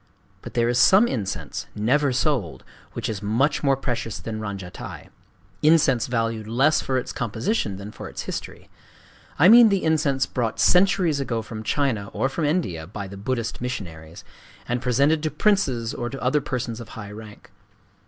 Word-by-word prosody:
But -, -, -10 dB
there 120 Hz, -1 st, +2 dB
is 120 Hz, 0 st, +1 dB
some 205 Hz, +5 st, +6 dB
incense,—never 105 Hz, -, -1 dB
sold,—which 125 Hz, -, -3 dB
is 105 Hz, -3 st, -4 dB
much 120 Hz, +8 st, +1 dB
more 135 Hz, -2 st, +2 dB
precious 120 Hz, -4 st, -3 dB
than 110 Hz, -1 st, -5 dB
ranjatai,—incense 115 Hz, -, -1 dB
valued 115 Hz, -2 st, -2 dB
less 135 Hz, +7 st, +3 dB
for 130 Hz, -, -1 dB
its 125 Hz, -, -3 dB
composition 115 Hz, -, -2 dB
than 100 Hz, +2 st, -8 dB
for -, -, -8 dB
its -, -, -6 dB
history: -, -, -6 dB, 0.7 s
I 160 Hz, -, +6 dB
mean 230 Hz, +2 st, +9 dB
the 195 Hz, -2 st, +1 dB
incense 145 Hz, -4 st, +2 dB
brought 120 Hz, -3 st, -2 dB
centuries 180 Hz, -4 st, +4 dB
ago 115 Hz, -5 st, -2 dB
from 110 Hz, 0 st, -7 dB
China 110 Hz, -4 st, -1 dB
or 135 Hz, -, 0 dB
from 150 Hz, +3 st, -2 dB
India 120 Hz, -, -1 dB
by 100 Hz, +1 st, -6 dB
the 100 Hz, -, -9 dB
Buddhist 115 Hz, +3 st, -3 dB
missionaries, 85 Hz, -10 st, -6 dB, 0.4 s
and 120 Hz, 0 st, -1 dB
presented 140 Hz, +5 st, +2 dB
to 155 Hz, -, -1 dB
princes 140 Hz, -, +1 dB
or 120 Hz, -, -4 dB
to 135 Hz, -, -7 dB
other 130 Hz, +4 st, +1 dB
persons 125 Hz, -4 st, -4 dB
of 115 Hz, -, -9 dB
high 105 Hz, -2 st, -7 dB
rank. 105 Hz, -1 st, -12 dB
120 Hz, 160 wpm, -24 LUFS, 110-145 Hz, 0.7 s, mean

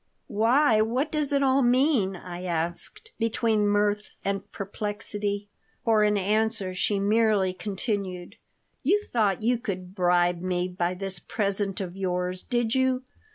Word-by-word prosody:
Why? 230 Hz, +2 st, +3 dB
What 255 Hz, +7 st, 0 dB
does 300 Hz, -2 st, 0 dB
it 280 Hz, -1 st, +2 dB
all 270 Hz, 0 st, +4 dB
mean?" 245 Hz, -5 st, +3 dB
I 175 Hz, 0 st, -8 dB
asked, 175 Hz, -, -4 dB
between 225 Hz, -2 st, +1 dB
mirth 205 Hz, 0 st, +1 dB, 0.2 s
and 195 Hz, 0 st, -2 dB
perplexity 205 Hz, 0 st, -4 dB, 0.4 s
For 220 Hz, -2 st, +4 dB
an 210 Hz, 0 st, +3 dB
answer 210 Hz, -1 st, +1 dB
she 195 Hz, +2 st, 0 dB
merely 205 Hz, -2 st, +2 dB
continued: 195 Hz, -1 st, -4 dB, 0.4 s
"You 395 Hz, +9 st, +2 dB
thought 215 Hz, -, 0 dB
you 240 Hz, +1 st, +2 dB
could 185 Hz, -6 st, -5 dB
bribe 175 Hz, -2 st, +2 dB
me 180 Hz, -1 st, -1 dB
by 180 Hz, 0 st, -1 dB
this 190 Hz, -1 st, -3 dB
present 200 Hz, 0 st, -2 dB
of 185 Hz, -2 st, -5 dB
yours, 180 Hz, -1 st, -2 dB
did 240 Hz, -2 st, -1 dB
you? 260 Hz, -1 st, +1 dB
205 Hz, 140 wpm, -26 LUFS, 185-230 Hz, 0.4 s, all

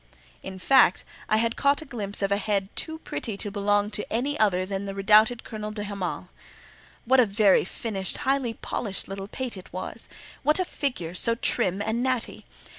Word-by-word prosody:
In 190 Hz, 0 st, -7 dB
fact, 245 Hz, 0 st, +4 dB, 0.2 s
I 215 Hz, -, +4 dB
had 230 Hz, +1 st, +1 dB
caught 280 Hz, +2 st, +2 dB
a -, -, -14 dB
glimpse 205 Hz, -7 st, -3 dB
of 195 Hz, -, 0 dB
a 200 Hz, -, +3 dB
head 200 Hz, -2 st, -1 dB
too 320 Hz, -1 st, -2 dB
pretty 220 Hz, -5 st, -4 dB
to 205 Hz, 0 st, -3 dB
belong 205 Hz, +1 st, +1 dB
to 210 Hz, -1 st, -3 dB
any 270 Hz, +6 st, 0 dB
other 185 Hz, -4 st, +3 dB
than 195 Hz, +1 st, -3 dB
the 195 Hz, 0 st, -5 dB
redoubted 215 Hz, +4 st, +4 dB
Colonel 215 Hz, -2 st, -6 dB
de 210 Hz, -1 st, -5 dB
Hamal. 200 Hz, -3 st, -4 dB, 0.8 s
What 260 Hz, +2 st, +4 dB
a 250 Hz, -, +7 dB
very 200 Hz, -1 st, +4 dB
finished, 195 Hz, 0 st, -3 dB
highly 265 Hz, -4 st, +1 dB
polished 205 Hz, -4 st, -3 dB
little 195 Hz, 0 st, -6 dB
pate 250 Hz, 0 st, -4 dB
it 185 Hz, -, -12 dB
was! 185 Hz, -, -5 dB, 0.3 s
What 300 Hz, -, +3 dB
a 370 Hz, -, +1 dB
figure, 245 Hz, -, -3 dB
so 230 Hz, +5 st, +3 dB
trim 195 Hz, -3 st, +1 dB
and 220 Hz, +3 st, -1 dB
natty! 255 Hz, -2 st, -1 dB
210 Hz, 190 wpm, -26 LUFS, 195-240 Hz, 0.8 s, a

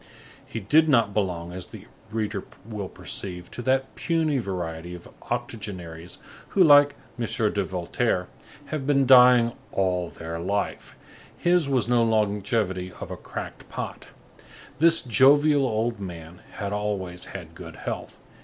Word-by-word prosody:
He 115 Hz, -, -6 dB
did 155 Hz, +10 st, +4 dB
not 115 Hz, -7 st, +3 dB
belong, 90 Hz, -4 st, -2 dB
as 90 Hz, 0 st, -7 dB
the -, -, -12 dB, 0.2 s
reader 105 Hz, -3 st, -2 dB, 0.2 s
will 105 Hz, -4 st, -5 dB
perceive, 90 Hz, -2 st, -5 dB
to -, -, -6 dB
that 130 Hz, +1 st, 0 dB
puny 160 Hz, -4 st, 0 dB
variety 90 Hz, -4 st, -4 dB
of 85 Hz, -, -12 dB, 0.2 s
octogenaries 90 Hz, -6 st, -5 dB, 0.3 s
who, 195 Hz, -, +4 dB
like 145 Hz, -2 st, +7 dB, 0.2 s
M. 120 Hz, -, 0 dB, 0.3 s
de 100 Hz, -, +1 dB
Voltaire, 90 Hz, +2 st, -1 dB, 0.4 s
have 140 Hz, -3 st, -4 dB
been 140 Hz, -2 st, +3 dB
dying 125 Hz, -2 st, +7 dB, 0.2 s
all 90 Hz, -3 st, 0 dB
their 85 Hz, 0 st, -6 dB
life; 100 Hz, +4 st, -3 dB, 0.4 s
his 175 Hz, -4 st, +2 dB
was 130 Hz, -5 st, +1 dB
no 120 Hz, -1 st, +3 dB
longevity 105 Hz, -3 st, 0 dB
of -, -, -7 dB
a -, -, -3 dB
cracked -, -, -8 dB
pot; -, -, -6 dB, 0.7 s
this 165 Hz, +1 st, +5 dB
jovial 140 Hz, +3 st, +5 dB
old 115 Hz, 0 st, -1 dB
man 85 Hz, -3 st, -8 dB
had 100 Hz, 0 st, -4 dB
always 100 Hz, -4 st, -3 dB
had -, -, -9 dB
good -, -, -10 dB
health. -, -, -6 dB
105 Hz, 140 wpm, -25 LUFS, 90-130 Hz, 0.7 s, like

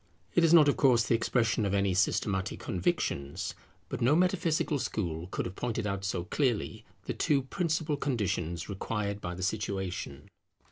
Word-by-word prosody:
It 175 Hz, -, +4 dB
is 165 Hz, -, +5 dB
not 160 Hz, -4 st, +8 dB
of 145 Hz, -, +3 dB
course 125 Hz, -4 st, +5 dB
the 110 Hz, -, +1 dB
expression 115 Hz, -1 st, +1 dB
of 100 Hz, -1 st, 0 dB
any 100 Hz, -1 st, +2 dB
systematic 95 Hz, 0 st, 0 dB
convictions; 80 Hz, -, -2 dB, 0.3 s
but -, -, -5 dB
no 130 Hz, +6 st, +4 dB
metaphysical 170 Hz, -4 st, +1 dB
school 85 Hz, -8 st, -3 dB
could -, -, -3 dB
have 90 Hz, -, -6 dB
pointed 115 Hz, -2 st, -2 dB
out 100 Hz, -1 st, -2 dB
so 90 Hz, -3 st, -1 dB
clearly 110 Hz, 0 st, -1 dB, 0.2 s
the -, -, -2 dB
two 140 Hz, -4 st, +1 dB
principal 160 Hz, 0 st, -1 dB
conditions 95 Hz, -, -2 dB
required 100 Hz, 0 st, -3 dB
by 90 Hz, 0 st, -4 dB
the 95 Hz, -, -5 dB
situation. 95 Hz, -8 st, -3 dB
105 Hz, 160 wpm, -30 LUFS, 95-135 Hz, 0.3 s, not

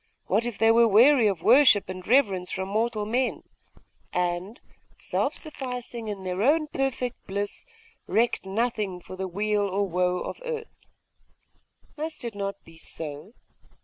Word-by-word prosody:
What 220 Hz, +5 st, +1 dB
if 240 Hz, -, -5 dB
they 225 Hz, 0 st, +5 dB
were 230 Hz, 0 st, +6 dB
weary 235 Hz, +3 st, +6 dB
of 195 Hz, -4 st, -1 dB
worship 255 Hz, -5 st, +6 dB
and 185 Hz, -1 st, -7 dB
reverence 200 Hz, -8 st, +3 dB
from 190 Hz, 0 st, -3 dB
mortal 215 Hz, 0 st, 0 dB
men, 245 Hz, +4 st, -1 dB, 0.7 s
and, 180 Hz, +4 st, -2 dB, 0.4 s
self -, -, -1 dB
sufficing 250 Hz, -6 st, -6 dB
in 200 Hz, -2 st, -5 dB
their 185 Hz, +1 st, -2 dB
own 305 Hz, +6 st, +3 dB
perfect 270 Hz, -4 st, -3 dB
bliss, 200 Hz, -, -4 dB, 0.4 s
recked 235 Hz, +2 st, +1 dB
nothing 210 Hz, -2 st, -2 dB
for 180 Hz, -, -10 dB
the 190 Hz, 0 st, -3 dB
weal 205 Hz, +3 st, 0 dB
or 200 Hz, +1 st, 0 dB
woe 180 Hz, 0 st, +1 dB
of 180 Hz, -, -6 dB
earth? 465 Hz, -2 st, -6 dB, 1.2 s
Must 315 Hz, -3 st, -5 dB
it 235 Hz, -, -4 dB
not 200 Hz, -1 st, -3 dB
be 165 Hz, 0 st, -16 dB
so? 155 Hz, +6 st, -7 dB
210 Hz, 145 wpm, -26 LUFS, 190-245 Hz, 1.2 s, were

